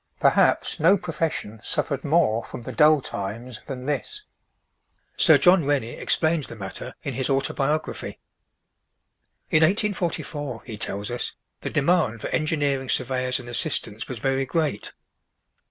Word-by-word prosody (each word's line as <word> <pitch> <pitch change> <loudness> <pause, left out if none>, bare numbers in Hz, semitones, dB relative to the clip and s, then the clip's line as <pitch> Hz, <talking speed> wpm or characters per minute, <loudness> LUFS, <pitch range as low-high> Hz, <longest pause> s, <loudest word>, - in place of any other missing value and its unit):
Perhaps - - +3
no 180 +6 +5
profession 160 - -3
suffered 145 -3 -2
more 140 -8 +2
from 120 - -9
the 130 - -6
dull 150 +4 +5
times 110 +3 -6
than 130 -3 -6
this. 420 - -3 0.9
Sir - - +6
John 180 -2 +5
Rennie 135 -5 0
explains 160 -2 +2
the - - -9
matter 95 -3 -7
in - - -3
his 130 0 -1
autobiography: 140 +2 -1 1.3
"In 155 - +4
1844," 165 - -1
he 110 - -6
tells 100 +1 -1
us, 120 - -3 0.3
"the - - -4
demand 145 -7 +1
for - - -4
engineering 145 -4 0
surveyors 130 0 0
and 125 - -10
assistants 115 -2 0
was 130 - -5
very 135 +3 0
great. 155 -10 -1
135 Hz, 135 wpm, -24 LUFS, 120-155 Hz, 1.3 s, Sir